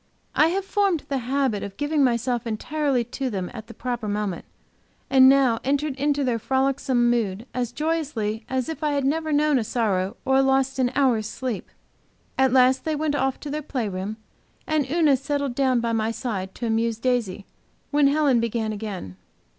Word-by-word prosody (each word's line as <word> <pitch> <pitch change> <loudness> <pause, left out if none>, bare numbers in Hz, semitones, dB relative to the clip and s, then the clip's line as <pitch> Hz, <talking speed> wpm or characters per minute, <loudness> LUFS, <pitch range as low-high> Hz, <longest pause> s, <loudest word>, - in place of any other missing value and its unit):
I 305 - +5
have 380 +3 -1
formed 390 -5 +1
the 275 -1 0
habit 255 -3 0
of 200 -1 -7
giving 290 0 +1
myself 240 -1 0
entirely 270 +3 0
to 255 +3 -4
them 190 -5 -4
at 220 -2 -8
the 230 - -10
proper 240 -3 -3
moment, 205 -3 -2 0.7
and 260 -1 +8
now 265 -4 +4
entered 285 +1 0
into 285 +1 0
their 245 -3 0
frolicsome 265 0 +1
mood 220 -2 -1
as 245 -1 -2
joyously 270 -8 -2
as 260 -1 -1
if 320 -1 -5
I 300 -1 +1
had 280 -2 0
never 315 +3 0
known 295 -2 +3
a - - -1
sorrow 200 -5 -1
or 265 0 +4
lost 270 0 +1
an 250 -1 +3
hour's 245 -6 +2
sleep. 245 -1 -4 0.7
At 265 -1 +3
last 260 0 +4
they 315 -1 -1
went 300 0 -1
off 270 -2 0
to 290 - -6
their 305 +1 -2
play 260 -6 -3
room, 195 +3 -4 0.5
and 305 -4 0
Una 310 -2 +4
settled 280 -1 -2
down 255 -2 +2
by 230 0 -1
my 220 0 0
side 205 -6 -4
to 240 - -4
amuse 225 0 0
Daisy, 225 -5 -1 0.5
when 290 -1 +4
Helen 285 -3 +3
began 230 -1 -1
again. 200 - -6
255 Hz, 185 wpm, -24 LUFS, 225-285 Hz, 0.7 s, and